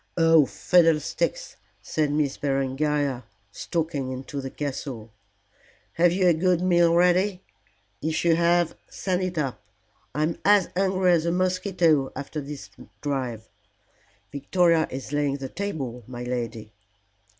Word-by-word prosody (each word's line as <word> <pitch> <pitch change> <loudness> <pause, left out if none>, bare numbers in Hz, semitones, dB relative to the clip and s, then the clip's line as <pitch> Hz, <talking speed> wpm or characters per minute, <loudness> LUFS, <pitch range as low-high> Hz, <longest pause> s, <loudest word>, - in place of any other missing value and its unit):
"Oh, 165 -4 +5
fiddlesticks!" 175 - +1 0.3
said 155 -2 0
Miss 145 -2 0
Berengaria, 135 -1 -1 0.3
stalking 155 - -3
into 135 +2 -5
the 135 - -5
castle. 130 -6 -5 0.8
"Have 175 +1 +4
you 185 +1 +1
a 175 - +6
good 180 +2 +2
meal 175 -2 +3
ready? 180 +2 +2 0.6
If 160 +2 -1
you 165 -1 +5
have, 170 0 +2 0.2
send 185 -1 -2
it 185 -2 -3
up. 135 -5 -2 0.5
I'm 155 +2 -1
as 205 -3 +4
hungry 185 -1 +2
as 170 -1 +2
a - - +2
mosquito 180 -5 +1
after 140 +2 -5
my 145 +1 -7 0.4
drive." 125 -6 -3 0.8
"Victoria 165 +3 +2
is 135 +2 -7
laying 145 -1 0
the 135 -1 -6
table, 135 -12 -5
my 125 -1 -7
lady." 115 -3 -4
155 Hz, 130 wpm, -25 LUFS, 135-175 Hz, 0.8 s, a